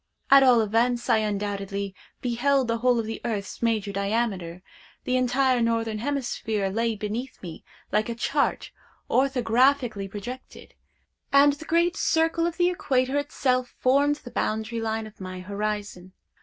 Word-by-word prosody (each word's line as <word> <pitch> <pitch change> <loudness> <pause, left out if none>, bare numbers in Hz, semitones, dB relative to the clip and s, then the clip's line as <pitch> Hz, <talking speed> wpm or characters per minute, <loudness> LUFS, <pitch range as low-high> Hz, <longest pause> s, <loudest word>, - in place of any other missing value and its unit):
At 275 0 +9
all 250 -3 +6
events 235 +3 +1
I - - +5
undoubtedly 200 -2 -3 0.3
beheld 260 +2 +1
the 230 0 -1
whole 250 0 +3
of 230 - -1
the 225 +1 -5
earth's 210 -4 -4
major 220 -3 0
diameter; 200 -4 -2 0.4
the 255 - 0
entire 255 0 +2
northern 230 -2 0
hemisphere 230 -6 -2
lay 230 +2 0
beneath 215 +5 -5
me 170 -3 -8 0.3
like 215 +2 +1
a 235 - -3
chart 280 +5 -1 0.4
orthographically 250 -4 +2
projected: 230 +6 -9 0.6
and 280 +1 +6
the 310 +3 -10
great 340 +2 +2
circle 330 +1 +1
of 340 - -5
the 355 0 +3
equator 270 -5 0
itself 255 -3 -1
formed 280 +3 +3
the 270 -5 -12
boundary 220 +1 -2
line 220 0 -2
of 215 -2 -13
my 185 0 -6
horizon. 200 -2 -4
230 Hz, 145 wpm, -25 LUFS, 210-265 Hz, 0.6 s, At